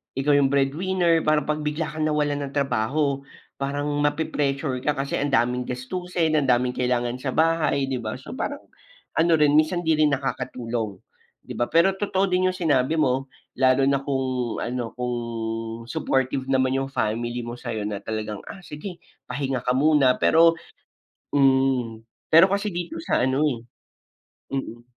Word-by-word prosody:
ikaw 140 +2 +2
yung 140 -1 +3
breadwinner, 165 +5 +2
parang 155 -1 +2
pag 150 0 0
bigla 150 +1 -2
kang 155 0 -1
nawalan 145 -1 0
ng 135 - -11
trabaho 140 +2 0 0.3
parang 140 +1 -2 0.2
mape-pressure 145 -3 -1
ka 150 - +2
kasi 140 0 -3
ang 145 0 -1
daming 125 +1 +2
gastusin, 160 +6 -2
ang 150 - +3
daming 125 0 +2
kailangan 125 -1 0
sa 130 +1 -4
bahay 160 -4 +2
'di 130 -2 -2
ba, 110 +4 -4
so 195 - -9
parang, 285 +2 -3 0.6
ano 165 +1 +3
rin 150 -1 +4
minsan 165 +3 +2
di 160 - +3
rin 155 -1 +3
nakakatulong, 120 -6 -3 0.5
'di - - -7
ba? 120 - -1
Pero 180 +4 +4
totoo 195 -1 0
din 185 0 +2
yung 185 - -4
sinabi 155 -3 +1
mo, 135 -1 +1 0.3
lalo 130 +1 +3
na 140 0 +2
kung 130 -4 -2
ano 120 -1 -3
kung 125 0 -2 0.7
supportive 130 +2 -1
naman 130 -1 +2
yung 135 - -4
family 120 0 -2
mo 120 - -5
sayo 115 -4 -4
na 105 -1 -4
talagang, 110 0 -4
"Ah, 195 - -8
sige 170 +4 -7 0.3
pahinga 130 -1 -2
ka 125 - 0
muna," 140 -3 +4
pero 165 0 +5 0.8
mm, 130 -4 +2 0.3
pero 165 +4 +8
kasi 200 0 -1
dito 175 -1 -4
sa - - +1
ano, 130 +4 +2
eh, 125 -6 0 1.0
mm. 120 -3 -5
135 Hz, 160 wpm, -24 LUFS, 125-155 Hz, 1.0 s, pero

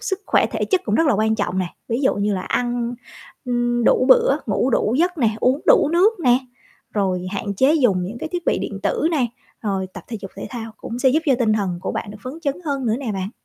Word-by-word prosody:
sức 400 -4 -2
khỏe - - +3
thể - - -2
chất 380 -2 +1
cũng 210 - 0
rất 325 +7 +3
là 265 - +4
quan 220 +1 +2
trọng 200 -3 -2
nè. 185 - 0 0.2
Ví 230 +2 -1
dụ 265 - +3
như 205 0 0
là 185 - -2
ăn, 240 -1 -1 0.5
ừm, 240 -1 0
đủ 255 - +4
bữa, - - +5
ngủ 265 - +1
đủ 225 0 +1
giấc 355 -1 +1
nè, 230 -4 +3
uống 260 +4 +2
đủ - - +6
nước 375 +3 +3
nè, 245 -4 +4 0.6
rồi 185 -3 0
hạn 200 0 -3
chế 265 +9 +4
dùng 235 - +2
những 220 +6 -6
cái 315 - -5
thiết 350 -1 -3
bị - - +2
điện - - -4
tử 460 -9 +1
nè, 280 -7 +1 0.4
rồi 195 -3 -1
tập 185 - -9
thể 230 - -4
dục 195 - -8
thể - - -6
thao 225 -3 -6
cũng 235 - -6
sẽ 265 - +4
giúp 305 +5 +3
cho 270 - +5
tinh 225 -3 +2
thần 195 -5 -1
của - - -2
bạn - - -4
được 210 - -10
phấn 255 +1 -6
chấn 280 -2 0
hơn 275 -4 -2
nữa 220 - +2
nè 240 -7 -3
bạn. 190 0 -3
240 Hz, 260 wpm, -21 LUFS, 205-280 Hz, 0.6 s, đủ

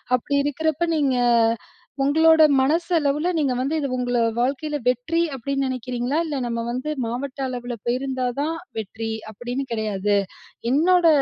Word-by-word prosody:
அப்படி 255 +3 -2
இருக்கிறப்போ, 315 +3 0
நீங்க, 275 -4 +2 0.9
உங்களோட 320 +3 +5 0.2
மனசளவில 310 +1 +1
நீங்க 275 -4 +1
வந்து, 275 +5 0
இது 285 - -1
உங்க 245 -1 0 0.2
வாழ்க்கையில 285 +4 -1
வெற்றி 250 +7 +1
அப்படின்னு 275 +2 -2
நினைக்கிறீங்களா? 255 +2 -2
இல்லை 295 -4 -3
"நம்ம 235 -1 -2
வந்து 255 +5 -3 0.2
மாவட்ட 255 +4 -4
அளவில 245 -1 -4
போயிருந்தா 255 +1 -1 0.2
தான் 320 +3 -1 0.2
வெற்றி" 220 +2 -5 0.2
அப்படின்னு 245 +5 -4
கிடையாது. 210 -2 0 0.6
"என்னோட 345 +5 +4
270 Hz, 130 wpm, -23 LUFS, 245-300 Hz, 0.9 s, உங்களோட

